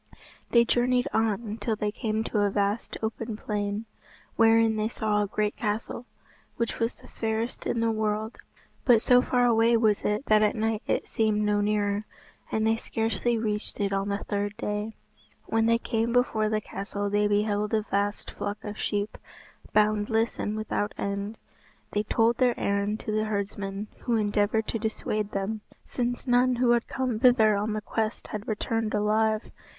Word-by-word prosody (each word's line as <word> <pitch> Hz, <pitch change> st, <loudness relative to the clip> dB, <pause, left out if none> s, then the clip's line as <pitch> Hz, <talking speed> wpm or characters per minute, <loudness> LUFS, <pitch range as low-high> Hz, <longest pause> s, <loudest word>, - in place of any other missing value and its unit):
They 235 Hz, -1 st, +5 dB
journeyed 245 Hz, +1 st, +2 dB
on 220 Hz, 0 st, 0 dB
till 225 Hz, -, 0 dB
they 210 Hz, 0 st, -1 dB
came 220 Hz, -1 st, -2 dB
to 215 Hz, -, -1 dB
a 205 Hz, 0 st, +3 dB
vast 205 Hz, +2 st, -1 dB
open 220 Hz, 0 st, -3 dB
plain, 205 Hz, 0 st, -3 dB, 0.5 s
wherein 225 Hz, 0 st, +5 dB
they 215 Hz, 0 st, 0 dB
saw 215 Hz, -2 st, 0 dB
a 205 Hz, -, 0 dB
great 210 Hz, +1 st, -1 dB
castle, 225 Hz, +2 st, -3 dB, 0.5 s
which 235 Hz, -, -2 dB
was 230 Hz, +1 st, 0 dB
the -, -, -17 dB
fairest 225 Hz, +2 st, -3 dB
in 230 Hz, -, 0 dB
the 230 Hz, 0 st, +2 dB
world. 215 Hz, +1 st, -2 dB, 0.4 s
But 235 Hz, -3 st, +5 dB
so 250 Hz, 0 st, +6 dB
far 245 Hz, -1 st, +2 dB
away 230 Hz, 0 st, +4 dB
was 215 Hz, -3 st, +2 dB
it 210 Hz, +6 st, -1 dB
that 215 Hz, 0 st, +4 dB
at 210 Hz, -1 st, +3 dB
night 220 Hz, -1 st, 0 dB
it -, -, 0 dB
seemed 215 Hz, -1 st, +1 dB
no 210 Hz, 0 st, +2 dB
nearer, 205 Hz, 0 st, 0 dB, 0.5 s
and 220 Hz, 0 st, +1 dB
they 225 Hz, 0 st, +3 dB
scarcely 225 Hz, +1 st, 0 dB
reached 210 Hz, -1 st, -2 dB
it 200 Hz, -1 st, 0 dB
on 195 Hz, +1 st, 0 dB
the 200 Hz, 0 st, -2 dB
third 205 Hz, 0 st, -2 dB
day. 210 Hz, +1 st, -3 dB, 0.5 s
When 225 Hz, 0 st, +1 dB
they 230 Hz, 0 st, +4 dB
came 230 Hz, 0 st, -1 dB
before 230 Hz, -3 st, +2 dB
the 215 Hz, 0 st, 0 dB
castle 205 Hz, 0 st, -4 dB
they 205 Hz, 0 st, +3 dB
beheld 210 Hz, 0 st, +1 dB
a 215 Hz, -, +1 dB
vast 205 Hz, 0 st, -1 dB
flock 205 Hz, 0 st, -4 dB
of 210 Hz, 0 st, -6 dB
sheep, 205 Hz, 0 st, -2 dB, 0.5 s
boundless 215 Hz, +2 st, +2 dB
and 215 Hz, +1 st, -2 dB
without 205 Hz, -1 st, -2 dB
end. 200 Hz, +2 st, -3 dB, 0.5 s
They 210 Hz, -, +1 dB
told 225 Hz, +2 st, +2 dB
their 250 Hz, -2 st, +2 dB
errand 200 Hz, +2 st, 0 dB
to 215 Hz, -, -4 dB
the 215 Hz, 0 st, +1 dB
herdsman, 200 Hz, -1 st, -3 dB
who 240 Hz, -, 0 dB
endeavoured 210 Hz, 0 st, +1 dB
to 225 Hz, -, -1 dB
dissuade 215 Hz, -1 st, -2 dB
them, 210 Hz, +2 st, -3 dB, 0.2 s
since 245 Hz, 0 st, -3 dB
none 250 Hz, 0 st, +3 dB
who 240 Hz, 0 st, +3 dB
had 235 Hz, -1 st, +2 dB
come 255 Hz, -4 st, -2 dB
thither 225 Hz, -4 st, +5 dB
on 210 Hz, +2 st, -1 dB
that 215 Hz, -1 st, -4 dB
quest 220 Hz, 0 st, -2 dB
had 210 Hz, 0 st, -5 dB
returned 220 Hz, 0 st, -1 dB
alive. 215 Hz, +1 st, +1 dB
215 Hz, 175 wpm, -27 LUFS, 210-225 Hz, 0.5 s, so